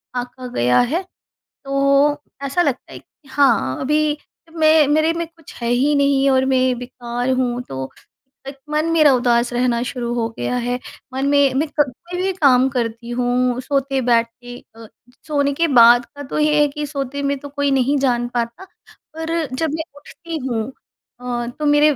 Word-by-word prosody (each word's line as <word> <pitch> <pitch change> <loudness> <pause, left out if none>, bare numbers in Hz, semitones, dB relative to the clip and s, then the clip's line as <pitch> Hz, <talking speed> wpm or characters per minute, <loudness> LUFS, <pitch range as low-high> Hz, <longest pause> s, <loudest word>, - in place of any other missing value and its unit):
आँका 250 +1 -5
गया 125 +1 +3
है, 285 +9 +1 0.6
तो 275 +2 +2 0.2
ऐसा 275 +6 0
लगता 280 -6 -2
है - - -9
कि 290 - -28
हाँ, 240 - +2
अभी 300 +2 +1 0.4
मैं 310 -2 +5
मेरे 310 +2 +2
में 335 0 -3
कुछ 330 -2 -16
है 235 - -1
ही 260 +5 +2
नहीं 280 -1 +3
और 260 0 +3
मैं 260 -1 +2
बेकार 245 0 -4
हूँ, 250 -1 0
तो 130 - -6 0.6
एक 275 0 -7
मन 305 +1 0
मेरा 310 -4 +5
उदास 240 -1 +2
रहना 240 -1 +1
शुरू 245 -2 -4
हो 230 -1 0
गया 250 - -2
है, 245 +1 -2 0.3
मन 265 +1 -1
में 280 -2 +3
मैं 295 +4 0
कभी 340 +7 -1
भी 385 - +1
काम 265 -7 +4
करती 235 -2 -3
हूँ। 245 0 0
सोते 275 0 -1
बैठते 245 0 -1 0.2
अ, 225 -1 -12 0.4
सोने 285 -2 +1
के 335 +3 +1
बाद 240 -2 +6
का 285 - -11
तो 285 - -4
ये 300 0 +3
है 295 - +4
कि, 295 +1 -5
सोते 280 -1 -4
में 280 0 0
तो 285 - -9
कोई 285 0 -1
नहीं 270 +2 +2
जान 240 -3 +1
पाता 235 +10 -3 0.5
पर 325 0 -4 0.3
जब 320 +3 -1
मैं 320 - -3
उठती 330 +3 -8
हूँ 230 -3 -1 0.6
अ, 240 -1 -3
तो 300 - -2
मेरे 295 0 +4
270 Hz, 180 wpm, -20 LUFS, 245-295 Hz, 0.6 s, बाद